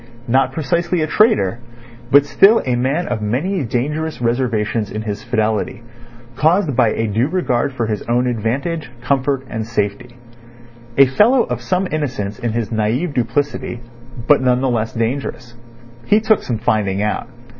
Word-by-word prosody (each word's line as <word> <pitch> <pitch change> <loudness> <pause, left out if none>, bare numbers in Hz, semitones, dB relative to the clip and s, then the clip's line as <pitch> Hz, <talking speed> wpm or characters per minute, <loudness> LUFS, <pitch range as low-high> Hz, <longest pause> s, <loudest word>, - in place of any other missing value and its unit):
Not 130 +3 +2
precisely 170 +2 0
a - - -1
traitor, 150 - +2 0.5
but 140 +2 +6
still 200 +9 +5
a 125 -2 +1
man 135 +8 0
of 120 -3 -2
many 145 - -1
dangerous 150 +7 -2
reservations 115 -3 0
in 110 +1 -5
his 105 -1 -4
fidelity, 110 +1 -1 0.5
caused 160 0 +2
by 120 -2 +4
a 110 +1 -1
due 110 +4 0
regard 145 -7 0
for 120 -3 -2
his 105 -2 -2
own 120 +1 +2
advantage, 125 +7 -2
comfort, 135 +1 0
and 110 -3 -4
safety. 115 +2 -3 0.8
A 135 - +8
fellow 220 - +4
of - - -4
some 185 +1 0
innocence 130 -9 -3
in 120 -3 -2
his 115 -1 -2
naive 115 +9 0
duplicity, 125 0 -2 0.5
but 145 0 +5
none 125 -1 +2
the 135 -1 +1
less 115 -1 -1
dangerous. 120 +1 -3 0.5
He 210 - +4
took 220 -1 +2
some 120 - -3
finding 105 -3 0
out. 105 - -2
125 Hz, 155 wpm, -18 LUFS, 115-150 Hz, 0.8 s, A